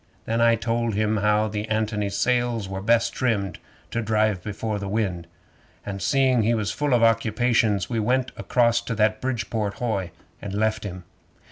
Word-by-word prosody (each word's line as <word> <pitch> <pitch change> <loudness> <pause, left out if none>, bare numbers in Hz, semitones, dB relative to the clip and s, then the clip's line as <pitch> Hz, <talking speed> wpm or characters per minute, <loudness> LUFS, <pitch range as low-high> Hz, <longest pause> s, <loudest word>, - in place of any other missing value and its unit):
Then 115 +1 0
I 115 0 +5
told 115 -1 -1
him 110 +1 +1
how 105 +1 +2
the 105 +1 -4
ANTONY's 105 -2 -1
sails 120 -3 +1
was 95 0 -5
best 115 0 +3
trimmed 105 -7 -1 0.3
to 115 - -1
drive 110 -3 +1
before 105 +1 -3
the 100 - -5
wind, 95 -5 -2 0.6
and 100 -1 -5
seeing 130 +4 +3
he 115 +2 +2
was 105 -3 -1
full 145 -3 +1
of 115 - +2
occupations 115 -2 +2
we 115 -2 -2
went 125 +4 +1
acrost 120 -2 +1
to 115 - -2
that 110 0 +1
Bridport 110 -5 -2
hoy, 105 -7 -2 0.3
and 100 -1 -5
left 110 0 0
him. 90 -2 -6
110 Hz, 170 wpm, -24 LUFS, 105-115 Hz, 0.6 s, I